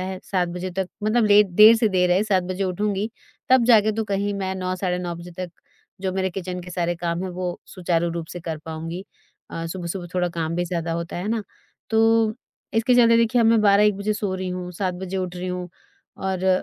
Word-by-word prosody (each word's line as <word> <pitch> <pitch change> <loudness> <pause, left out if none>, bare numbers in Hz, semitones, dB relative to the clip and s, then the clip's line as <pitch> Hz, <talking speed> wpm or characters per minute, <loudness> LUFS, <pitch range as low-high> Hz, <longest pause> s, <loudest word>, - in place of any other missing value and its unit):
है 185 0 -4
7:00 180 -3 0
बजे 180 +1 -4
तक 190 -1 0 0.2
मतलब 220 +1 +3
ले 205 0 +7
देर 210 +4 +7
से 225 -1 +2
देर 180 -2 +2
है 185 +3 +4
7:00 190 -4 +2
बजे 185 +2 -2
उठूँगी, 205 +3 -1 0.4
तब 255 -2 +5
जाके 215 -3 +5
तो 220 +1 -2
कहीं 200 0 -1
मैं 190 -1 -2
9:00 185 0 -2
साढ़े 180 -1 -1
9 175 -1 -4
बजे 170 +1 -10
तक, 180 -1 -4 0.5
जो 190 -1 -1
मेरे 190 0 -1
किचन 180 0 -5
के 180 - -10
सारे 175 -1 -1
काम 170 +1 -2
हैं 185 - -3
वो 180 0 -4
सुचारु 170 -2 -1
रूप 165 -1 -4
से 175 - -7
कर 160 -2 -4
पाऊँगी। 165 +3 -6 0.5
अ, 165 0 -4
सुबह-सुबह 175 +1 -5
थोड़ा 180 -1 +1
काम 165 -1 -3
भी 175 - 0
ज़्यादा 170 -1 -2
होता 170 0 -4
है 180 +4 -3
ना, 225 -1 0 0.5
तो 225 0 +3 0.4
इसके 225 +3 +3
चलते 230 -1 +6
देखिए 230 +1 +3
अब 225 - +4
मैं 225 -1 +5
12:00-1:00 205 0 +5
बजे 205 +1 -1
सो 205 -3 -2
रही 185 0 -3
हूँ, 180 0 -4
7:00 180 0 -2
बजे 190 +1 -5
उठ 180 -1 -3
रही 180 +1 -4
हूँ, 180 0 -4 0.5
और 190 -1 0
185 Hz, 225 wpm, -23 LUFS, 175-205 Hz, 0.5 s, ले